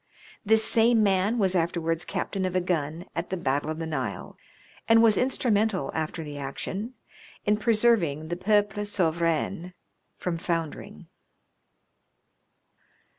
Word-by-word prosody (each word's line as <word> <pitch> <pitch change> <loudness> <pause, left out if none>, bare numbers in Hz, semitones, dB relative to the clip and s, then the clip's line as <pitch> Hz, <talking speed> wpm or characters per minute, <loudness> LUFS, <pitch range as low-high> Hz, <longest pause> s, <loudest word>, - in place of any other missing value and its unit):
This 220 0 +5
same 225 -1 +5
man 200 +3 +2
was 190 -4 +2
afterwards 165 -1 -1
captain 195 -2 -3
of 185 -1 -2
a - - +4
gun 165 -2 -2
at 170 +1 -3
the 190 - -2
Battle 145 -1 -1
of 155 - -3
the 165 - -4
Nile, 130 -10 -4 0.5
and 225 0 +6
was 220 -2 +5
instrumental 220 - 0
after 160 +1 -3
the 145 -1 -7
action 195 - -5 0.5
in 210 -1 +3
preserving 210 -10 +2
the 175 - -2
Peuple 205 +2 +1
Souverain 170 -2 -1 0.4
from 170 -2 -3
foundering. 165 -3 -4
180 Hz, 125 wpm, -26 LUFS, 160-210 Hz, 0.5 s, and